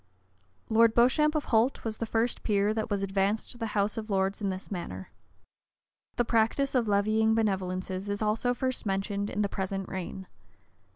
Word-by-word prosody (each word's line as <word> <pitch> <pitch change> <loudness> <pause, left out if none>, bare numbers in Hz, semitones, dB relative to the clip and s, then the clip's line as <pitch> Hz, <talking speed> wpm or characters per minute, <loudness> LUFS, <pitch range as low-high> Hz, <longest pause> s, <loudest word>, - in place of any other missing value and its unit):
Lord 225 0 +4
Beauchamp, 300 +6 +4
of 305 - +1
Holt, 225 +4 +3
was 220 -1 -3
the 230 - -3
first 230 +2 0
peer 205 0 +1
that 220 +1 -2
was 200 -2 -1
advanced 195 +2 0
to 240 - -9
the 225 - -2
house 205 +2 +1
of 220 0 -8
lords 195 0 0
in 200 - 0
this 190 +2 -6
manner. 95 - -6 1.0
The 240 - +1
practice 230 +5 +1
of 245 -4 +2
levying 215 +2 +3
benevolences 190 -2 -1
is 205 0 -2
also 220 +3 +1
first 255 +1 -2
mentioned 200 +1 -1
in 210 - -1
the - - +1
present 195 -1 -3
reign. 190 0 -5
210 Hz, 175 wpm, -29 LUFS, 195-225 Hz, 1.0 s, Lord